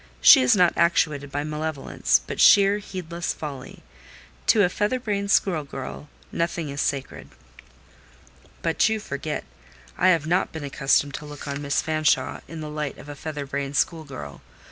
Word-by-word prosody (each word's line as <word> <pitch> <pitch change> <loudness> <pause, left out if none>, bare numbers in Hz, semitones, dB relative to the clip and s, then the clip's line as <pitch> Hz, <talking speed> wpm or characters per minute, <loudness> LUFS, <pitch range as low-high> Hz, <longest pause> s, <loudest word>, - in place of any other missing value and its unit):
She - - +9
is 125 - +4
not 180 -3 +4
actuated 150 -4 +1
by 145 +1 -2
malevolence, 155 -1 -1
but - - -6
sheer, 200 0 +6
heedless 175 -4 -5
folly. 140 -4 -8 0.6
To 210 - +5
a - - +4
feather 210 +7 -1
brained 200 -4 -2
school 175 -6 +2
girl 140 +1 -8 0.2
nothing 170 -2 -2
is 140 +1 -3
sacred." 140 -2 -3 1.3
"But 165 +6 +2
you 220 0 -1
forget: 150 -4 -4 0.6
I 185 - +4
have 165 -5 +3
not 175 +4 +1
been 160 -2 -7
accustomed 140 0 +1
to 150 - -6
look 150 0 -9
on 140 0 -4
Miss 140 -1 0
Fanshawe 155 -4 +1
in 165 -1 -8
the 155 - -5
light 150 -2 -4
of 145 - -12
a 145 - -7
feather 150 0 -5
brained 140 0 -3
school 160 +1 0
girl. 75 - -9
155 Hz, 165 wpm, -24 LUFS, 140-170 Hz, 1.3 s, She